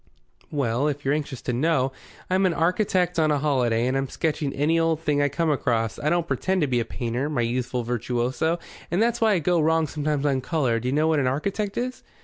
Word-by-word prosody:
"Well, 135 Hz, -2 st, 0 dB
if 145 Hz, -1 st, -3 dB
you're 135 Hz, -, +2 dB
anxious 145 Hz, -4 st, -4 dB
to 125 Hz, -, -2 dB
know, 135 Hz, 0 st, +1 dB, 0.4 s
I'm 190 Hz, +1 st, +2 dB
an 170 Hz, -, -1 dB
architect 180 Hz, 0 st, +1 dB
on 155 Hz, -1 st, +3 dB
a 150 Hz, -, +2 dB
holiday, 125 Hz, -5 st, +1 dB
and 130 Hz, +1 st, 0 dB
I'm 135 Hz, -1 st, -1 dB
sketching 150 Hz, -2 st, -1 dB
any 155 Hz, +5 st, +1 dB
old 165 Hz, -1 st, +1 dB
thing 150 Hz, -3 st, +1 dB
I 145 Hz, -, +2 dB
come 165 Hz, +1 st, 0 dB
across. 115 Hz, -6 st, 0 dB
I 150 Hz, -, 0 dB
don't 170 Hz, 0 st, +1 dB
pretend 190 Hz, +1 st, 0 dB
to 150 Hz, -, +2 dB
be 125 Hz, -2 st, +1 dB
a 115 Hz, -, -1 dB
painter, 120 Hz, +5 st, -3 dB
my 140 Hz, -6 st, 0 dB
youthful 125 Hz, +1 st, -1 dB
virtuoso, 125 Hz, +7 st, -1 dB, 0.3 s
and 175 Hz, -, 0 dB
that's 235 Hz, +1 st, +1 dB
why 220 Hz, -2 st, +4 dB
I -, -, +3 dB
go 170 Hz, +1 st, +2 dB
wrong 160 Hz, +1 st, +3 dB
sometimes 150 Hz, -1 st, -2 dB
on 135 Hz, -2 st, +1 dB
colour. 130 Hz, -5 st, 0 dB
Do 125 Hz, -, -4 dB
you -, -, +1 dB
know 155 Hz, +3 st, +2 dB
what 160 Hz, -2 st, +2 dB
an 130 Hz, -, +1 dB
architect 195 Hz, +10 st, -2 dB
is?" 255 Hz, +1 st, -3 dB
150 Hz, 230 wpm, -24 LUFS, 130-165 Hz, 0.4 s, why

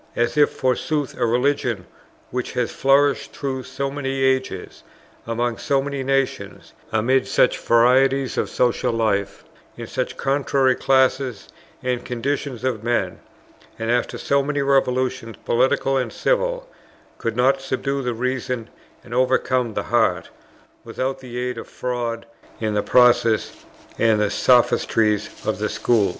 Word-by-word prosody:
as 120 Hz, 0 st, 0 dB
if 150 Hz, -1 st, +5 dB
forsooth 135 Hz, +2 st, -1 dB
a 125 Hz, -, -2 dB
Religion 120 Hz, -5 st, 0 dB, 0.5 s
which 125 Hz, 0 st, -3 dB
has 125 Hz, -2 st, -1 dB
flourished 140 Hz, +1 st, +2 dB
through 135 Hz, -2 st, -3 dB
so 135 Hz, +2 st, -4 dB
many 135 Hz, -1 st, -2 dB
ages, 130 Hz, -8 st, -1 dB, 0.5 s
among 115 Hz, 0 st, -1 dB
so 140 Hz, -, +1 dB
many 140 Hz, 0 st, -3 dB
nations, 135 Hz, 0 st, -2 dB, 0.2 s
amid 120 Hz, +5 st, +2 dB
such 125 Hz, -, +3 dB
varieties 130 Hz, +3 st, +3 dB
of -, -, -1 dB
social 125 Hz, 0 st, +1 dB
life, 105 Hz, -3 st, -1 dB, 0.3 s
in -, -, -6 dB
such -, -, -4 dB
contrary 135 Hz, -1 st, +2 dB
classes 130 Hz, -3 st, +1 dB, 0.3 s
and 125 Hz, -1 st, -1 dB
conditions 130 Hz, 0 st, -3 dB
of 120 Hz, -5 st, -2 dB
men, 115 Hz, -7 st, -1 dB, 0.6 s
and 115 Hz, +1 st, -2 dB
after 120 Hz, 0 st, 0 dB
so 140 Hz, 0 st, +1 dB
many 145 Hz, 0 st, -1 dB
revolutions, 130 Hz, -4 st, 0 dB
political 135 Hz, +2 st, +2 dB
and 125 Hz, -4 st, -1 dB
civil, -, -, 0 dB, 0.5 s
could 115 Hz, -1 st, -2 dB
not 135 Hz, +3 st, +3 dB
subdue 135 Hz, +1 st, -2 dB
the 125 Hz, -2 st, -2 dB
reason 125 Hz, -1 st, -2 dB, 0.4 s
and 120 Hz, -, -10 dB
overcome 125 Hz, -2 st, +1 dB
the -, -, -1 dB
heart, -, -, +1 dB, 0.5 s
without 135 Hz, +1 st, -3 dB
the 125 Hz, -2 st, -8 dB
aid 125 Hz, -1 st, -3 dB
of -, -, -9 dB
fraud 120 Hz, -2 st, -4 dB, 0.3 s
in 110 Hz, -1 st, -1 dB
the 105 Hz, -, +1 dB
process 120 Hz, -2 st, +4 dB, 0.5 s
and 110 Hz, -2 st, +3 dB
the 105 Hz, -1 st, +1 dB
sophistries 110 Hz, -3 st, +2 dB
of -, -, -1 dB
the -, -, -1 dB
schools. 110 Hz, -5 st, +2 dB
125 Hz, 140 wpm, -22 LUFS, 115-135 Hz, 0.6 s, if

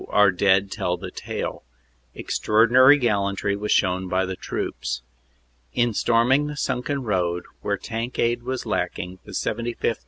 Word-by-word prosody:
our 105 Hz, -1 st, +5 dB
dead 95 Hz, +1 st, +2 dB
tell 90 Hz, 0 st, -1 dB
the -, -, -7 dB
tale. -, -, -5 dB, 0.5 s
Extraordinary 125 Hz, +6 st, +4 dB
gallantry 100 Hz, -5 st, 0 dB
was 105 Hz, +1 st, -3 dB
shown 95 Hz, 0 st, +2 dB
by 95 Hz, +1 st, +1 dB
the 95 Hz, 0 st, -4 dB
troops. 65 Hz, -8 st, -4 dB, 0.7 s
In 120 Hz, -1 st, +2 dB
storm 115 Hz, +3 st, +2 dB
ing 145 Hz, +2 st, +3 dB
the 150 Hz, 0 st, -6 dB
sunken 130 Hz, +1 st, -2 dB
road, 90 Hz, -5 st, 0 dB, 0.2 s
where 100 Hz, 0 st, -1 dB
tank 115 Hz, +3 st, -5 dB
aid 120 Hz, +1 st, +1 dB
was 130 Hz, +1 st, -4 dB
lacking, 90 Hz, +1 st, -3 dB
the -, -, -11 dB
75th. 115 Hz, 0 st, -2 dB
105 Hz, 150 wpm, -24 LUFS, 95-120 Hz, 0.7 s, our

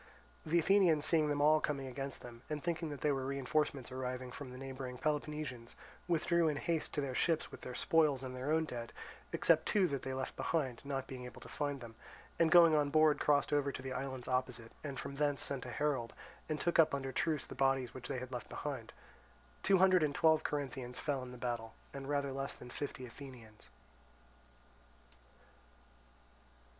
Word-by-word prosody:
The 165 Hz, +2 st, +3 dB
Athenians 170 Hz, -4 st, +4 dB
seeing 155 Hz, -2 st, +3 dB
them 145 Hz, 0 st, +1 dB
all 155 Hz, +1 st, +6 dB
coming 140 Hz, -2 st, -1 dB
against 135 Hz, +1 st, -5 dB
them, 120 Hz, -1 st, -10 dB
and 150 Hz, -1 st, -3 dB
thinking 170 Hz, -2 st, -1 dB
that 145 Hz, -2 st, -6 dB
they 150 Hz, -, +3 dB
were 135 Hz, -1 st, -1 dB
reinforcements 140 Hz, 0 st, -1 dB
arriving 130 Hz, 0 st, -4 dB
from 135 Hz, +1 st, -7 dB
the 125 Hz, -, -9 dB
neighbouring 130 Hz, -1 st, -6 dB
Peloponnesians, 150 Hz, -4 st, -3 dB, 0.3 s
withdrew 170 Hz, 0 st, +3 dB
in 150 Hz, -2 st, +1 dB
haste 165 Hz, +1 st, -1 dB
to 145 Hz, -, +1 dB
their 135 Hz, -2 st, -2 dB
ships 160 Hz, +4 st, +1 dB
with -, -, -10 dB
their 125 Hz, -, -6 dB
spoils 150 Hz, -2 st, +3 dB
and 130 Hz, -1 st, -5 dB
their 130 Hz, +4 st, -2 dB
own 160 Hz, 0 st, +3 dB
dead, 120 Hz, -5 st, -6 dB, 0.4 s
except -, -, +3 dB
two 205 Hz, -3 st, +4 dB
that 140 Hz, -2 st, -2 dB
they 130 Hz, 0 st, -3 dB
left 130 Hz, 0 st, -4 dB
behind, 135 Hz, -8 st, -1 dB
not 135 Hz, -1 st, -3 dB
being 130 Hz, -2 st, -7 dB
able 125 Hz, -, -9 dB
to -, -, -10 dB
find 145 Hz, -2 st, -3 dB
them, 115 Hz, -1 st, -9 dB, 0.5 s
and 165 Hz, -1 st, +5 dB
going 170 Hz, -1 st, +8 dB
on 145 Hz, -1 st, +3 dB
board 155 Hz, 0 st, +5 dB
crossed 145 Hz, 0 st, +3 dB
over 145 Hz, -1 st, +2 dB
to 130 Hz, -, -7 dB
the 130 Hz, 0 st, -4 dB
islands 130 Hz, -1 st, -4 dB
opposite, 125 Hz, -3 st, -1 dB
and 140 Hz, -3 st, -4 dB
from 140 Hz, -, -6 dB
thence 145 Hz, -1 st, +1 dB
sent 135 Hz, -3 st, -2 dB
a -, -, -5 dB
herald, 135 Hz, -4 st, -1 dB, 0.4 s
and 155 Hz, -1 st, -1 dB
took 170 Hz, +2 st, +1 dB
up 155 Hz, -3 st, +6 dB
under 135 Hz, -1 st, -3 dB
truce 155 Hz, 0 st, 0 dB
the -, -, -9 dB
bodies 135 Hz, -2 st, +1 dB
which 130 Hz, -, -7 dB
they -, -, -2 dB
had 130 Hz, 0 st, -6 dB
left 125 Hz, -3 st, -5 dB
behind. 135 Hz, -6 st, -5 dB, 0.7 s
Two 195 Hz, -, +4 dB
hundred 185 Hz, -1 st, +6 dB
and 150 Hz, -2 st, +1 dB
twelve 160 Hz, -1 st, +5 dB
Corinthians 130 Hz, -4 st, -3 dB
fell 140 Hz, -3 st, -1 dB
in 125 Hz, -1 st, -7 dB
the 125 Hz, -, -9 dB
battle, 120 Hz, -2 st, -3 dB, 0.2 s
and 140 Hz, 0 st, -6 dB
rather 140 Hz, -1 st, 0 dB
less 135 Hz, +1 st, -3 dB
than 125 Hz, -, -11 dB
fifty 130 Hz, -2 st, -5 dB
Athenians. 120 Hz, -4 st, -12 dB
140 Hz, 195 wpm, -35 LUFS, 130-150 Hz, 0.7 s, going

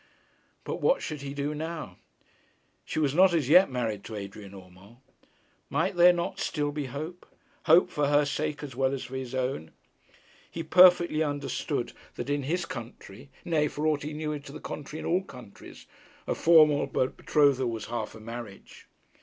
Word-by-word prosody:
But -, -, -5 dB
what -, -, +2 dB
should 150 Hz, -3 st, -5 dB
he 140 Hz, 0 st, -6 dB
do 145 Hz, +1 st, -2 dB
now? 155 Hz, -, -6 dB, 0.9 s
She -, -, -5 dB
was 145 Hz, -3 st, +1 dB
not 180 Hz, +1 st, +5 dB
as 150 Hz, -6 st, 0 dB
yet 180 Hz, +5 st, +7 dB
married 115 Hz, -6 st, -3 dB
to 110 Hz, -, -7 dB
Adrian 100 Hz, 0 st, -8 dB
Urmand. 95 Hz, +4 st, -15 dB, 0.7 s
Might -, -, 0 dB
there 175 Hz, +1 st, +7 dB
not 175 Hz, -1 st, -3 dB
still 145 Hz, -1 st, -1 dB
be 145 Hz, -1 st, -4 dB
hope; 155 Hz, +7 st, -7 dB, 0.4 s
hope 165 Hz, +2 st, +5 dB
for 145 Hz, -1 st, 0 dB
her 145 Hz, +1 st, +3 dB
sake 150 Hz, +1 st, -3 dB
as 135 Hz, -5 st, -7 dB
well 135 Hz, +1 st, +1 dB
as 135 Hz, -, -6 dB
for 130 Hz, -, -8 dB
his 130 Hz, -1 st, -5 dB
own? 130 Hz, -11 st, -2 dB, 0.8 s
He 165 Hz, -, -5 dB
perfectly 175 Hz, -1 st, +5 dB
understood 145 Hz, -, -2 dB, 0.2 s
that 145 Hz, -, -4 dB
in 145 Hz, 0 st, 0 dB
his 170 Hz, +6 st, -2 dB
country 120 Hz, +1 st, -9 dB, 0.2 s
nay, 155 Hz, -4 st, +1 dB
for 150 Hz, +2 st, -4 dB
aught 155 Hz, -2 st, +1 dB
he 150 Hz, +1 st, -5 dB
knew 150 Hz, -1 st, -3 dB
to 140 Hz, -1 st, -12 dB
the 155 Hz, -, -9 dB
contrary, 150 Hz, +1 st, -7 dB
in -, -, -7 dB
all 180 Hz, +3 st, +1 dB
countries 125 Hz, -, -13 dB, 0.4 s
a -, -, -1 dB
formal 155 Hz, -3 st, +5 dB
betrothal 135 Hz, 0 st, +1 dB
was 115 Hz, -2 st, -5 dB
half 115 Hz, -2 st, -5 dB
a -, -, -11 dB
marriage. 115 Hz, -2 st, -10 dB
145 Hz, 175 wpm, -28 LUFS, 120-155 Hz, 0.9 s, yet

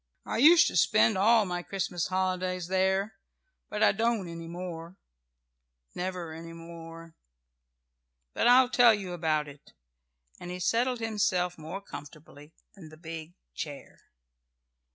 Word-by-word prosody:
I -, -, -3 dB
used 325 Hz, +6 st, +7 dB
to -, -, -2 dB
spend 220 Hz, -, +4 dB
all 220 Hz, +3 st, +4 dB
my 180 Hz, -1 st, -3 dB
Christmas 180 Hz, -2 st, -3 dB
holidays 185 Hz, -1 st, -2 dB
there, 190 Hz, +2 st, 0 dB, 0.5 s
but 210 Hz, 0 st, -1 dB
I 205 Hz, -, +6 dB
don't 225 Hz, -2 st, 0 dB
any 165 Hz, 0 st, -8 dB
more. 170 Hz, 0 st, -7 dB, 1.0 s
Never 180 Hz, -3 st, -4 dB
any 165 Hz, +1 st, -9 dB
more. 165 Hz, 0 st, -11 dB, 1.2 s
But -, -, +1 dB
I'll 250 Hz, +1 st, +6 dB
tell 240 Hz, -3 st, +6 dB
you 190 Hz, -3 st, -6 dB
about 155 Hz, -3 st, 0 dB
it," 145 Hz, 0 st, -15 dB, 0.7 s
and 175 Hz, -, -8 dB
he 180 Hz, 0 st, -5 dB
settled 235 Hz, +6 st, 0 dB
himself 205 Hz, -5 st, 0 dB
more 165 Hz, +5 st, -7 dB
comfortably 150 Hz, -2 st, -12 dB, 0.2 s
in 170 Hz, -6 st, -12 dB
the 155 Hz, -, -14 dB
big 165 Hz, 0 st, -9 dB, 0.2 s
chair. -, -, -8 dB
180 Hz, 130 wpm, -28 LUFS, 165-205 Hz, 1.2 s, used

